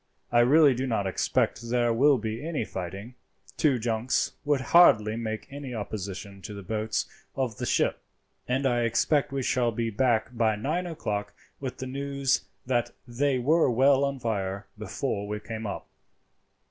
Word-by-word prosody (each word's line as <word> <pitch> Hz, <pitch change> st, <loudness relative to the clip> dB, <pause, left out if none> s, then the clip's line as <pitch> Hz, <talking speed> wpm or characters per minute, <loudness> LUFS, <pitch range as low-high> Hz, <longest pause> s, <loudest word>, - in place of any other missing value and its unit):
I 120 Hz, -, +4 dB
really 140 Hz, +4 st, +6 dB
do 130 Hz, +2 st, -2 dB
not 110 Hz, -5 st, 0 dB
expect 115 Hz, +4 st, 0 dB
there 120 Hz, -1 st, +2 dB
will 140 Hz, +4 st, +5 dB
be 110 Hz, +2 st, -4 dB
any 155 Hz, -7 st, -2 dB
fighting. 95 Hz, +6 st, -6 dB, 0.4 s
Two 145 Hz, -5 st, +3 dB
junks 115 Hz, +1 st, 0 dB
would 145 Hz, -1 st, +2 dB
hardly 110 Hz, -11 st, +6 dB
make 110 Hz, -1 st, -4 dB
any 140 Hz, -3 st, -6 dB
opposition 100 Hz, -2 st, -6 dB
to 105 Hz, +3 st, -7 dB
the 100 Hz, -, -8 dB
boats 110 Hz, +3 st, -1 dB, 0.3 s
of 130 Hz, -5 st, -2 dB
the -, -, -2 dB
ship, -, -, +1 dB, 0.5 s
and 130 Hz, +2 st, 0 dB
I 120 Hz, -2 st, +2 dB
expect 125 Hz, +6 st, +1 dB
we 135 Hz, -1 st, -2 dB
shall 120 Hz, -1 st, +1 dB
be 115 Hz, +1 st, -2 dB
back 120 Hz, +1 st, +1 dB
by 110 Hz, -2 st, +2 dB
nine 155 Hz, +12 st, -2 dB
o'clock 105 Hz, -10 st, -4 dB, 0.2 s
with 130 Hz, -2 st, -5 dB
the 130 Hz, -, -5 dB
news 140 Hz, 0 st, -1 dB, 0.2 s
that 120 Hz, -1 st, 0 dB
they 130 Hz, +3 st, +1 dB
were 150 Hz, +5 st, +3 dB
well 135 Hz, +3 st, +4 dB
on 140 Hz, 0 st, 0 dB
fire 100 Hz, -5 st, -2 dB
before 105 Hz, 0 st, -3 dB
we 105 Hz, 0 st, -3 dB
came 110 Hz, 0 st, -6 dB
up." 100 Hz, -, -5 dB
120 Hz, 165 wpm, -27 LUFS, 110-135 Hz, 0.5 s, really